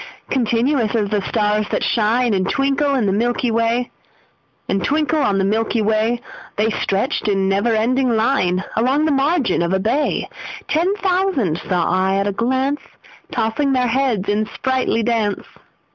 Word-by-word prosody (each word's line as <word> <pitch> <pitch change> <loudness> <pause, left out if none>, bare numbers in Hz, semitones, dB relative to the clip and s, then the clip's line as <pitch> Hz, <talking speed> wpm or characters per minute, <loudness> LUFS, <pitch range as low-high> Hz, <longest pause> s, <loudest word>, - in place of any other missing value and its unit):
Continuous 240 -1 +1
as 210 -2 0
the 210 -1 +1
stars 210 0 0
that - - -1
shine 230 +1 +1
And 185 -1 0
twinkle 275 +1 +1
on 265 -5 +1
the 195 - +1
milky 240 +3 0
way, 230 +2 0 0.8
The 195 - 0 2.0
stretched 200 +4 -1
in 195 -2 +1
never 200 +4 +1
ending 255 +4 +1
line 190 -6 +1
Along 265 +7 +2
the 315 - +2
margin 280 - +1
of 170 +2 0
a 190 - +2
bay: 250 +9 0 0.4
Ten 355 +6 +1
thousand 365 - 0
saw 180 -3 -1
I 185 +1 +1
at 195 0 0
a 205 - 0
glance, 260 +7 -1 0.5
Tossing 235 +5 0
their 255 -1 +2
heads 235 -6 0
in 210 +1 0
sprightly 260 -3 -1
dance. 220 -3 -1
230 Hz, 140 wpm, -19 LUFS, 205-270 Hz, 2.0 s, Along